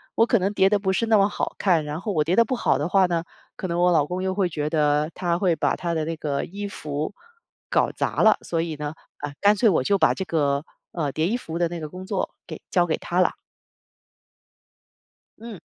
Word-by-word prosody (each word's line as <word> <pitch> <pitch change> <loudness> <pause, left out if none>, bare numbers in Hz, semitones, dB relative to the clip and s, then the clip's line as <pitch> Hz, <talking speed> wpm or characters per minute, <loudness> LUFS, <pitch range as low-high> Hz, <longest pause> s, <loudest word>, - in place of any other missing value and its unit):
我 230 - +5
可 235 -1 +2
能 190 +2 0
叠 190 - +4
得 205 0 +2
不 190 -1 0
是 230 +4 +1
那 225 -1 +4
么 200 +1 +4
好 - - -3
看， 170 -6 +2
然 150 +3 -5
后 215 - -3
我 155 -4 +2
叠 170 +4 +1
得 230 - +6
不 255 - -1
好 - - +1
的 150 - -1
话 190 0 +4
呢， 170 -2 -1 0.3
可 185 - -4
能 170 0 -2
我 180 - +4
老 150 -4 +3
公 180 +3 -4
又 190 0 0
会 190 -1 +1
觉 150 -3 -3
得 150 -1 +2
他 175 -2 -1
会 180 -3 +2
把 - - +1
他 170 -1 -3
的 160 -1 -1
那 165 0 -3
个 145 -3 -2
衣 205 +3 -6
服 150 -3 -4 0.6
搞 - - +2
砸 - - -1
了。 - - +6
所 165 -1 -2
以 165 -2 -3
呢， 150 +1 -5 0.2
啊， 145 0 -6
干 205 +1 +5
脆 225 +3 +3
我 165 -9 +2
就 200 +8 +2
把 - - +4
这 190 - -4
个， 145 -4 0 0.3
呃， 150 -5 -2
叠 155 +4 0
衣 225 - 0
服 165 -8 -6
的 175 - +2
那 170 0 -6
个 155 - -5
工 185 +3 -9
作 190 -1 -2 0.2
给 - - -8
交 175 -1 +3
给 165 - -1
他 175 - -2
了。 185 - +3 2.1
嗯。 225 -6 -8
175 Hz, 260 characters per minute, -24 LUFS, 155-195 Hz, 2.1 s, 得